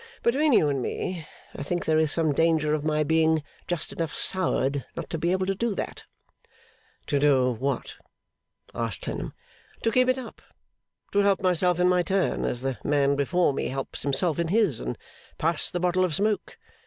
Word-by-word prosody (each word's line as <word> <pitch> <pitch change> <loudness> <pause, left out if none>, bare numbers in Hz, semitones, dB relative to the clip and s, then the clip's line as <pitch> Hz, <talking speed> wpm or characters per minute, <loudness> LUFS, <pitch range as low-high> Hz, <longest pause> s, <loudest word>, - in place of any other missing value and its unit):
Between 285 +6 +3
you 190 - +5
and 140 -2 0
me, 170 +5 -4 0.3
I - - -6
think 175 +5 -2
there 155 0 +3
is 155 -2 +2
some 160 -2 +1
danger 160 0 +2
of 150 -1 -1
my 155 0 +1
being 160 0 +2 0.2
just 175 -2 -3
enough 165 -3 -3
soured 140 -7 +2
not - - -6
to 165 - -2
be 170 +2 +1
able 185 0 +1
to 195 - 0
do 220 +1 -2
that.' - - -5 1.0
'To 145 - 0
do 135 -3 +4
what?' 130 +2 -3 0.8
asked 115 -5 -2
Clennam. - - -5 0.5
'To 225 - +2
keep 255 +2 +3
it 255 - +2
up. 255 -3 -9 0.7
To 200 - +2
help 200 -1 +2
myself 180 -1 +2
in 180 - +4
my 180 0 +3
turn, 190 +2 0
as 120 +1 -2
the 135 -2 -2
man 140 -1 +2
before 145 +3 +2
me - - -2
helps 135 0 -4
himself 145 +4 +1
in 170 - 0
his, 195 - +2
and 60 0 -4 0.4
pass 165 0 0
the 175 - -3
bottle 180 +1 +2
of 175 -5 0
smoke. 210 +3 -1
165 Hz, 190 wpm, -26 LUFS, 145-185 Hz, 1.0 s, you